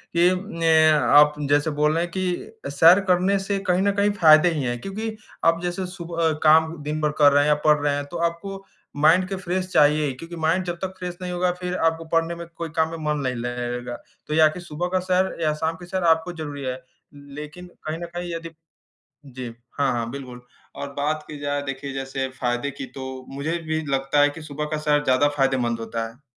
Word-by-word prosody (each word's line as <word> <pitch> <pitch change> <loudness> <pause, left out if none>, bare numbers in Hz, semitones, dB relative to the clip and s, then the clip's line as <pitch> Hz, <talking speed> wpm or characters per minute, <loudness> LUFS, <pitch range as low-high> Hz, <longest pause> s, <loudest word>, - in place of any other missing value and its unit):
कि 175 +1 +5 0.3
ने 165 - +2 0.2
आप 150 +1 +5 0.2
जैसे 145 +2 +3
बोल 150 +1 +3
रहे 165 +1 +1
हैं 175 - -5
कि 185 +1 -4
सैर 165 +7 +7
करने 185 +2 +3
से 195 +1 -2
कहीं 180 +1 +3
न 200 - +3
कहीं 205 +1 +3
फ़ायदे 155 +2 +7
ही 150 - -2
हैं 120 -1 -2
क्योंकि 220 +3 -4 0.3
आप 165 0 +3
जैसे 175 +1 -2
सुबह 170 -3 -2
काम 160 +1 +5
दिन 150 +1 -3
भर 150 - +1
कर 145 -1 +7
रहे 145 0 +4
हैं 150 - +1
या 150 - +5
पढ़ 150 0 +6
रहे 145 0 +1
हैं 145 - -3
तो 175 - -4
आपको 195 +3 -9 0.4
माइंड 180 +4 +5
के 195 - -2
फ्रेश 185 0 -2
चाहिए 150 +1 +4
ही 135 - -2
क्योंकि 165 +6 -9
माइंड 165 +3 +1
जब 175 - -3
तक 190 0 -3
फ्रेश 180 -1 -5
नहीं 180 0 -4
होगा 180 0 +1
फिर 180 0 -2
आपको 165 0 0
पढ़ने 165 +1 +1
में 170 0 -7
कोई 165 0 -5
काम 160 -1 +2
में 165 - -5
मन 150 - 0
नहीं 130 -1 -1
लगेगा। 120 0 -4 0.3
तो 150 - -3
या 155 0 +6
कि 180 - -7
सुबह 175 +1 -4
का 185 0 +1
सैर 185 +1 0
या 155 -2 +2
शाम 160 +2 -2
की 175 - -11
सैर 185 +1 -3
आपको 165 +1 +2
ज़रूरी 145 -3 -6
है 130 0 -4 0.3
लेकिन 150 +5 -10 0.2
कहीं 155 - -2
न 170 - -5
कहीं 175 -1 -4
यदि 165 0 -5 0.8
जी, 130 -2 -8 0.3
हाँ, 140 -2 +2
हाँ 115 -1 -2
बिल्कुल। 125 -3 -8 0.3
और 140 - -6
बात 150 +2 -1
की 150 - -8
जाए 145 0 -2
देखिए 135 0 -5
जैसे 135 0 -3
फ़ायदे 125 +3 -1
की 135 0 -7
तो 135 -1 -6 0.2
मुझे 145 +5 -2
भी 160 0 0
लगता 135 +1 +1
है 145 - +5
कि 145 +3 -9
सुबह 150 0 -5
का 155 - 0
सैर 150 -1 +1
ज़्यादा 130 +1 +3
फ़ायदेमंद 130 -4 +1
होता 115 0 -3
है। 125 +5 -19
155 Hz, 225 wpm, -23 LUFS, 140-175 Hz, 0.8 s, सैर